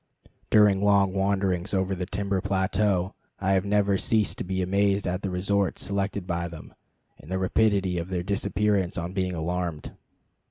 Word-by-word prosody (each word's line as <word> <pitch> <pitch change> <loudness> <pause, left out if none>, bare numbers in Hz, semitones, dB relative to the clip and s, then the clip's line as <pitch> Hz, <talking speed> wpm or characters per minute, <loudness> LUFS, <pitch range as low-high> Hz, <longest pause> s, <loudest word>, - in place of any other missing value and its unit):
During 105 -2 +5
long 100 -2 +4
wanderings 95 -1 0
over 95 0 0
the 90 -1 -4
timber 100 -1 -1
plateau 95 -1 0 0.3
I 95 0 0
have 95 0 +1
never 100 -1 +2
ceased 110 -2 +1
to - - -2
be 95 0 -2
amazed 100 +1 +1
at 90 +1 -2
the 100 - -2
resorts 100 +2 0
selected 100 0 -2
by 85 -1 -2
them, 85 -2 -11 0.5
and 75 - -14
by 95 - -2
the - - 0
rapidity 95 -1 +1
of 85 +2 -5
their 90 -2 -2
disappearance 100 -1 0
on 85 +1 -4
being 95 -1 -1
alarmed. 85 -2 -3
95 Hz, 170 wpm, -26 LUFS, 90-100 Hz, 0.5 s, During